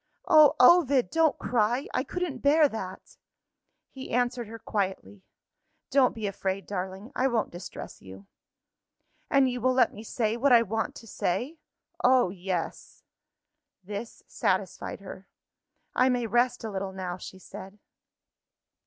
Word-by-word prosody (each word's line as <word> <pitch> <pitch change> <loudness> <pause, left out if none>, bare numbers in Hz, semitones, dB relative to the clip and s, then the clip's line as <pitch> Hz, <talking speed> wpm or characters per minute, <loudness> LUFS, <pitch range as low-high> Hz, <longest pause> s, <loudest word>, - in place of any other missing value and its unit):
Oh, 305 -2 +7
Ovid, 275 -2 +5
don't 325 -1 +3
cry! 240 +3 0
I - - 0
couldn't 350 -5 -4
bear 295 +3 +5
that." 190 -7 -8 0.7
He 265 -1 -9
answered 245 -1 0
her 225 +2 -8
quietly. 190 - -3 0.7
"Don't 265 -2 +4
be 220 -2 -4
afraid, 195 -1 -3
darling; 190 +4 -5
I 260 - +2
won't 235 -4 -1
distress 175 +1 -9
you." 95 +1 -12 1.0
"And 275 -1 +4
you 250 -1 -3
will 255 +2 +2
let 255 - +3
me 210 - -9
say, 225 0 -1
what 275 +3 +2
I 235 -1 +7
want 225 +1 -3
to - - -11
say?" 250 - -3 0.4
"Oh, 250 -7 +4
yes!" 180 -2 -5 0.8
This 205 +4 -7
satisfied - - -2
her. - - -10 0.7
"I 255 +1 +3
may 245 -2 0
rest 240 +2 +1
a 220 - -4
little 190 -1 -4
now," 185 -1 -5
she 190 - -10
said. 190 +1 -11
230 Hz, 140 wpm, -27 LUFS, 195-255 Hz, 1.0 s, Oh